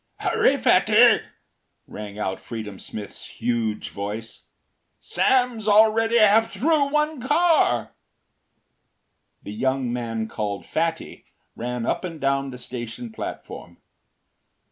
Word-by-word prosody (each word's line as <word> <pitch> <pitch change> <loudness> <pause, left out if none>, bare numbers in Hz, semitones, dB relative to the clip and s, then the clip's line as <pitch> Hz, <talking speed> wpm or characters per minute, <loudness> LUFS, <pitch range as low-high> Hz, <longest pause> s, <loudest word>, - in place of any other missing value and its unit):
“Hurry, - - +2
Fatty,” - - +5 0.6
rang 105 -1 -9
out 95 -3 -3
Freedom 110 -5 -7
Smith’s 105 -2 -8
huge 115 -3 -2
voice, 105 +3 -6 0.5
“Sam’s 245 -4 +1
already 220 +2 +4
half 220 +1 +5
through 295 0 +1
one 300 -1 0
car.” 290 - +2 1.5
The 100 - -7
young 130 +1 -1
man 115 -2 -3
called 100 -5 -4
“Fatty” 165 0 -3 0.3
ran 120 0 -4
up - - -1
and 165 -3 -6
down 140 0 0
the 125 - -8
station 120 - -7
platform. 220 - -8
130 Hz, 105 wpm, -23 LUFS, -, 1.5 s, Fatty